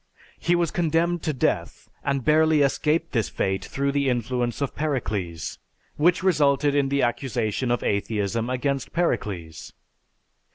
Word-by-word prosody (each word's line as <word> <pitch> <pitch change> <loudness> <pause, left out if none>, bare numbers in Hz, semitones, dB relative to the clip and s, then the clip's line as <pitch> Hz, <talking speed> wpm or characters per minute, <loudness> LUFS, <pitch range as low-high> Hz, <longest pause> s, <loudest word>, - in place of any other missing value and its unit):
He 175 - +2
was 170 -2 +1
condemned 170 +1 +1
to 155 - -1
death 135 - -1 0.2
and 140 -2 -1
barely 155 0 +4
escaped 155 +4 +1
this 115 -5 0
fate 95 0 -1
through 140 +1 -1
the 140 -1 +1
influence 120 0 -1
of 140 -2 -2
Pericles; 100 - -3 0.4
which 175 +4 +3
resulted 145 -5 +3
in 140 -1 +2
the 140 0 +1
accusation 120 -1 -1
of 120 -2 0
atheism 105 +2 -1
against 135 +1 -2
Pericles. 100 - -2
135 Hz, 135 wpm, -24 LUFS, 115-155 Hz, 0.4 s, barely